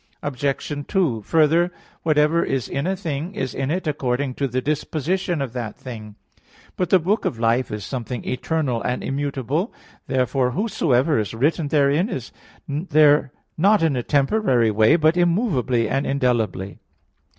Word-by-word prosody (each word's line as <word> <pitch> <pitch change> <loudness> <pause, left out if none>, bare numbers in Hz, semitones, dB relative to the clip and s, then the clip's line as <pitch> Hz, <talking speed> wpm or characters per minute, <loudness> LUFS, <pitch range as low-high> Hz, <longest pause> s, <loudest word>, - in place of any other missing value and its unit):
Obj. 140 +1 -2
2: 160 - +1
Further, 165 - +3 0.3
whatever 155 +1 +3
is 135 -3 -2
in 140 +5 -2
a 190 - 0
thing 170 0 -4
is 130 - -3
in 135 0 -2
it 180 +4 -1
according 140 -3 -1
to 140 +2 -1
the 130 0 -1
disposition 155 +4 -1
of 125 -4 -6
that 120 -4 -5
thing. 110 -5 -9 0.6
But 180 -3 -1
the 190 - +6
book 190 +6 0
of 115 - -2
life 115 +2 +1
is 105 -1 -5
something 125 -1 -5
eternal 130 -2 -1
and 125 - -2
immutable. 140 - -2 0.4
Therefore 130 -1 +1
whatsoever 155 - +1
is 105 +1 -3
written 150 +6 +1
therein, 145 +6 +2
is 130 - -5 0.4
there 150 -2 +3 0.3
not 200 +1 +4
in 155 -4 +2
a 125 - 0
temporary 135 - +2
way, 110 +7 +4
but 155 0 +3
immovably, 170 - +1
and 135 +5 -1
indelibly. 115 -8 -1
140 Hz, 150 wpm, -22 LUFS, 125-165 Hz, 0.6 s, the